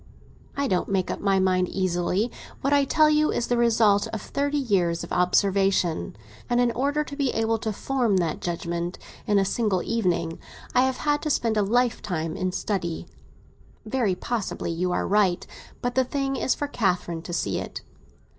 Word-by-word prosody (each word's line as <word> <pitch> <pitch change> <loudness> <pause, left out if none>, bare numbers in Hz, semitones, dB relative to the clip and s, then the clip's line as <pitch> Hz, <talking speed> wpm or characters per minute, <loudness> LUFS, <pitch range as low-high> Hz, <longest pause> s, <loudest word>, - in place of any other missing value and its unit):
"I 280 0 +1
don't 185 -2 0
make 190 -2 0
up - - -4
my 195 -1 +2
mind 185 -1 +2
easily. 185 +4 0 0.3
What 275 +2 +1
I 285 -1 +4
tell 310 +3 +4
you 305 0 +3
is 240 - -1
the 245 - 0
result 225 -4 +3
of 220 - -4
thirty 285 +4 -1
years 185 -10 +1
of - - -6
observation; 180 - +2 0.3
and 240 0 +2
in 245 -1 +3
order 285 +5 0
to 285 - -8
be 280 -2 0
able 225 0 0
to 220 - -2
form 235 -2 0
that 170 -3 -1
judgement 170 0 -3 0.3
in 205 - +3
a 195 - +3
single 195 -3 0
evening, 170 -7 -1 0.3
I 250 - +5
have 260 -1 -1
had 295 0 0
to 310 - -2
spend 230 -6 +1
a 210 - +3
lifetime 200 -7 0
in 185 0 -1
study." 180 -3 -2 0.8
"Very 215 -4 0
possibly 215 -4 -3
you 180 +2 -1
are - - 0
right. 195 -3 +2 0.4
But 245 0 0
the 260 - +3
thing 270 +1 -2
is 265 - +1
for 290 - -3
Catherine 180 - -1
to 170 - -8
see 170 - -1
it." - - -6
205 Hz, 185 wpm, -25 LUFS, 180-250 Hz, 0.8 s, I